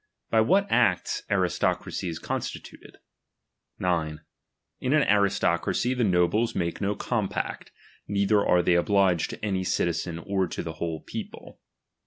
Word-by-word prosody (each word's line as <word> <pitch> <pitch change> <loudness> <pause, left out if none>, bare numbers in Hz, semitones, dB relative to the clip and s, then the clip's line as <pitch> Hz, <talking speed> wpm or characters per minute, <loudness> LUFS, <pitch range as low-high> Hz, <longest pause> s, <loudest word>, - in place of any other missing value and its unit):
By 110 - +5
what 195 - +3
acts - - +2
aristocracy 90 - 0
is 80 - -4
constituted. - - -6 0.8
S. 85 -4 0 0.7
In 130 - 0
nn 155 -2 +3
aristocracy 100 +3 +2
the 125 -1 0
oobies 100 +5 +2
make 85 -2 -2
no 100 +1 0
compact, 110 -2 -3 0.4
neither 100 +1 +2
are 90 0 +3
tliey 85 -1 +3
oliiigc«l 95 -4 +2
to - - -6
any 95 -2 -1
citizen 85 -1 -1
or 95 +2 -1
to - - -5
the 80 - -5
whole 80 -1 -4
people. - - -8
95 Hz, 135 wpm, -26 LUFS, 85-105 Hz, 0.8 s, By